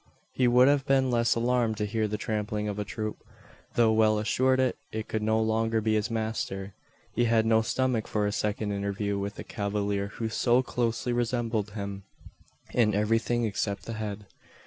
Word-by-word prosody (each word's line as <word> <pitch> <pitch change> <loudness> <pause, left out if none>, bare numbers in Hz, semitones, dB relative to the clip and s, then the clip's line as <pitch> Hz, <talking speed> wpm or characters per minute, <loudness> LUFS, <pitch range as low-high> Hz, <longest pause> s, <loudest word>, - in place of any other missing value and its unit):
He 125 - +2
would 125 +2 +6
have 140 -2 +2
been 135 -1 +3
less 115 -1 +2
alarmed 120 -2 +1
to 105 - -1
hear 110 +1 0
the 105 0 -3
trampling 105 -1 -2
of 105 0 -3
a - - 0
troop. 110 +1 -4 0.6
Though 115 -2 +4
well 110 -1 +4
assured 130 +4 +2
it 115 -4 -2
could 110 - -2
no 110 +1 +2
longer 110 0 +1
be 110 0 +1
his 105 +2 +1
master, 110 -4 -3 0.4
he 120 - +2
had 115 -1 +3
no 110 0 +4
stomach 125 0 0
for 105 -1 0
a 105 - 0
second 105 0 -1
interview 100 0 -2
with 100 +1 -4
the - - -7
cavalier 100 -1 -2
who 110 +2 -4
so 120 +3 +2
closely 120 0 -1
resembled 115 -3 -1
him 100 -2 -5 0.7
in 110 -4 +3
everything 115 +3 +1
except 100 -1 -2
the 115 - -5
head. 105 -2 -5
110 Hz, 180 wpm, -28 LUFS, 105-120 Hz, 0.7 s, would